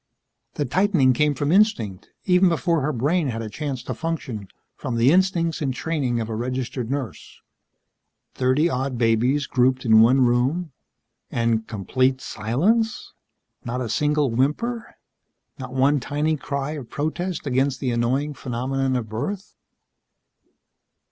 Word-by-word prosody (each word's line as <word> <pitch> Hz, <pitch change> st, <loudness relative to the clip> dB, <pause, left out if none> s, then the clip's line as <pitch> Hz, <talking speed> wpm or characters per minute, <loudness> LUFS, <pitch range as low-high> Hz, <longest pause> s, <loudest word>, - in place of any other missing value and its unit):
The 145 Hz, -, -1 dB
tightening 165 Hz, -3 st, +3 dB
came 150 Hz, +3 st, +2 dB
from 145 Hz, +3 st, -1 dB
instinct, 180 Hz, -, +2 dB, 0.2 s
even 180 Hz, -1 st, +4 dB
before 165 Hz, -1 st, +1 dB
her 150 Hz, +3 st, 0 dB
brain 150 Hz, +6 st, 0 dB
had 115 Hz, -2 st, -3 dB
a 110 Hz, -, -6 dB
chance 140 Hz, -4 st, -4 dB
to -, -, -4 dB
function, 135 Hz, -11 st, -4 dB, 0.3 s
from 125 Hz, -, -4 dB
the 120 Hz, +4 st, +4 dB
instincts 175 Hz, -2 st, +2 dB
and 140 Hz, -3 st, 0 dB
training 130 Hz, -4 st, -1 dB
of 110 Hz, -, -3 dB
a 110 Hz, -, -4 dB
registered 125 Hz, +1 st, -3 dB
nurse. 130 Hz, -, -5 dB, 0.9 s
Thirty 130 Hz, +5 st, +2 dB
odd 130 Hz, -4 st, -2 dB
babies 120 Hz, +5 st, +2 dB
grouped 130 Hz, 0 st, +1 dB
in 110 Hz, -1 st, +7 dB
one 125 Hz, +4 st, +5 dB
room 130 Hz, +8 st, +1 dB, 0.6 s
and 115 Hz, -1 st, 0 dB
complete 130 Hz, +5 st, 0 dB
silence. 180 Hz, -, -1 dB, 0.5 s
Not 120 Hz, +1 st, -3 dB
a 120 Hz, -3 st, -3 dB
single 150 Hz, +1 st, +1 dB
whimper. 220 Hz, -, -1 dB, 0.6 s
Not 130 Hz, -1 st, -7 dB
one 135 Hz, +3 st, +3 dB
tiny 150 Hz, +4 st, -1 dB
cry 140 Hz, 0 st, -3 dB
of 145 Hz, -6 st, -7 dB
protest 165 Hz, +3 st, -3 dB
against 135 Hz, 0 st, 0 dB
the 130 Hz, -3 st, -1 dB
annoying 130 Hz, +5 st, 0 dB
phenomenon 130 Hz, +1 st, -2 dB
of 120 Hz, -3 st, -2 dB
birth. 145 Hz, -, -5 dB
135 Hz, 140 wpm, -23 LUFS, 120-155 Hz, 0.9 s, in